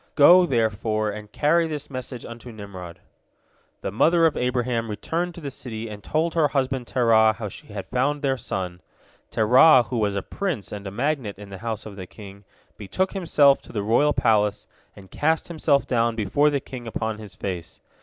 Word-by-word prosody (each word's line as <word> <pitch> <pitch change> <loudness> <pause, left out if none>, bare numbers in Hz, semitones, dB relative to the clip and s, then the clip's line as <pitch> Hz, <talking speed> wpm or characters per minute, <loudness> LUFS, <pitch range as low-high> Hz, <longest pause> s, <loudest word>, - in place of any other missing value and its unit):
Go, 175 +5 +7
therefore, 110 -4 0
and 105 0 -9
carry 165 +6 +2
this 150 -2 -5
message 130 -2 -6
unto 120 +1 -9
Nimrod." 95 -5 -9 0.8
The - - -3
mother 165 - +4
of 160 - +2
Abraham 125 -2 -1
returned 165 - -3
to 170 - -9
the 140 -2 -5
city 115 -3 -6
and 105 -1 -9
told 160 +2 0
her 160 -3 +3
husband 135 -3 -1
Terah 110 -3 +4
how 110 -1 -6
she - - -12
had 100 -2 -6
found 145 +4 -1
their 135 -1 +2
son. 90 -7 -5 0.5
Terah, 125 +5 +6
who 120 - 0
was 100 -2 0
a 100 - -2
prince 175 - -4
and 100 -1 -6
a - - -5
magnate 125 -2 -2
in 100 0 -11
the 95 - -8
house 110 0 -4
of 105 -2 -9
the 95 -2 -7
king, 100 -1 -13 0.3
betook 185 - -2
himself 150 -7 +4
to - - -14
the 105 -3 -3
royal 120 +8 +3
palace, 105 -5 +1 0.3
and 95 -2 -15
cast 160 +3 0
himself 155 -4 +1
down 115 -2 +1
before 115 +8 +2
the 145 -1 0
king 125 -3 -9
upon 110 -1 -3
his 105 -2 -11
face. 90 -4 -6
115 Hz, 190 wpm, -24 LUFS, 105-145 Hz, 0.8 s, Go